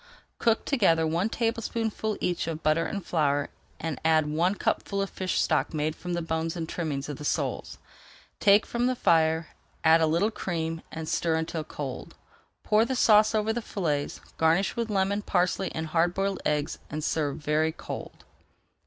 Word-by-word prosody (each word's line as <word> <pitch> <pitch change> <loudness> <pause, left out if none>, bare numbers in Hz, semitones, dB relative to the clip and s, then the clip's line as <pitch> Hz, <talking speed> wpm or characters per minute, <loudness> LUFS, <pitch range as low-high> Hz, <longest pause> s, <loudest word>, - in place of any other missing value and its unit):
Cook 230 -1 +2
together 170 - +3
one 170 +6 0
tablespoonful 225 -2 -1
each 175 -2 -1
of 160 -1 -4
butter 155 +2 +2
and 200 -4 -5
flour, 145 -3 +1 0.3
and 160 -2 -4
add 160 -1 +4
one 165 +6 +1
cupful 200 0 -1
of 195 0 -1
fish 185 -1 -1
stock - - +1
made 155 +1 -1
from 180 0 -5
the 175 -1 -1
bones 160 +1 -2
and 165 -2 -4
trimmings 150 -5 -3
of 145 -3 -5
the - - -8
soles. - - -2 0.6
Take 205 0 +5
from 240 +1 0
the 255 - +1
fire, 160 -5 +2 0.3
add 160 +1 +6
a 160 - +4
little 170 +8 +2
cream, 165 -5 -3
and 160 0 -6
stir 165 0 +1
until 160 0 -2
cold. 145 -4 -7 0.5
Pour 215 +1 +4
the 260 +3 -1
sauce 215 -2 +5
over 215 +1 +1
the 240 - -2
fillets, 150 -10 -2 0.2
garnish 165 +5 +2
with 235 -1 -2
lemon, 200 0 +1
parsley, 185 0 0
and 160 - -2
hard 165 +2 +1
boiled 195 0 -1
eggs, 150 -1 -1
and 155 +1 -4
serve 150 -3 -1
very 155 +1 +1
cold. - - -8
165 Hz, 175 wpm, -27 LUFS, 160-200 Hz, 0.6 s, add